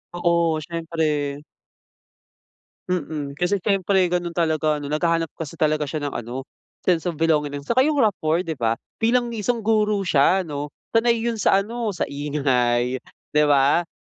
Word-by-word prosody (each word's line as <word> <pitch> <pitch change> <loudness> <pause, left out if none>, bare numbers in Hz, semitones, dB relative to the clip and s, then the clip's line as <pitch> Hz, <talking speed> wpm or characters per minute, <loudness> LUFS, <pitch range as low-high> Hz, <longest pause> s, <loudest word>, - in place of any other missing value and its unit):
Oo, 170 -2 +1
siyempre. 155 -3 -2 1.5
Mm. 155 -5 -2
Kasi 180 +1 0
siyempre 190 -2 +2
gano'n 175 -1 -1
talaga 160 -2 +1
'no. 145 -1 -5
Naghahanap 165 +1 +1
kasi 165 -1 -6
talaga 155 -1 +1
siya 150 +1 -4
ng 145 - -3
ano, 120 +3 -6 0.4
sense 180 -1 +1
of 170 - -2
belonging 150 -2 +1
'no. 140 - -6
Tsaka 235 - +1
yung 290 +2 +3
rapport 175 -5 +1
di 160 -6 -5
ba? 115 -1 +1 0.2
Bilang 240 +1 +2
isang 230 +1 -2
guro 210 -2 +2
siya 175 +3 +3
'no, 145 -3 -4 0.2
sanay 230 +1 +3
yun 230 0 -2
sa 195 -1 +3
ano, 225 -2 -3
sa - - -1
ingay, 130 -4 0 0.3
di 150 0 +4
ba? 145 +4 +3
165 Hz, 155 wpm, -23 LUFS, 145-195 Hz, 1.5 s, di